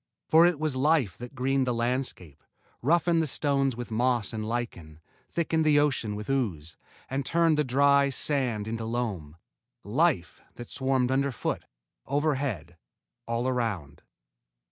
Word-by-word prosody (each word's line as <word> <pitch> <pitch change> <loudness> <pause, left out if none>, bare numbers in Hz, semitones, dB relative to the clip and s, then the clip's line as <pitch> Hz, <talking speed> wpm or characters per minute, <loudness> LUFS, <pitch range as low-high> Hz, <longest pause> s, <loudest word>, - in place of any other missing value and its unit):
For 165 +2 +6
it 175 -4 0
was 155 -3 -1
life 135 - +2
that 125 +3 -9
greened 130 0 +1
the 125 - 0
landscape, 115 - -2 0.4
roughened 170 +4 +3
the 160 - -1
stones 135 -2 0
with 120 -1 -7
moss 120 -1 +1
and 110 -1 -3
lichen, 110 -9 -5 0.3
thickened 160 -1 0
the 150 -1 +4
ocean 125 -8 0
with 105 0 -6
ooze, 90 - -2 0.3
and 135 +1 -2
turned 165 +3 +2
the 150 - +2
dry 140 +1 +4
sand 130 -6 0
into 115 0 -3
loam 105 -10 -3 0.5
life 125 - 0
that 120 - -9
swarmed 130 -2 +1
underfoot, 135 -1 -1 0.4
overhead, 135 - -1 0.5
all 115 +2 -1
around! 110 - -2
130 Hz, 140 wpm, -27 LUFS, 110-140 Hz, 0.5 s, For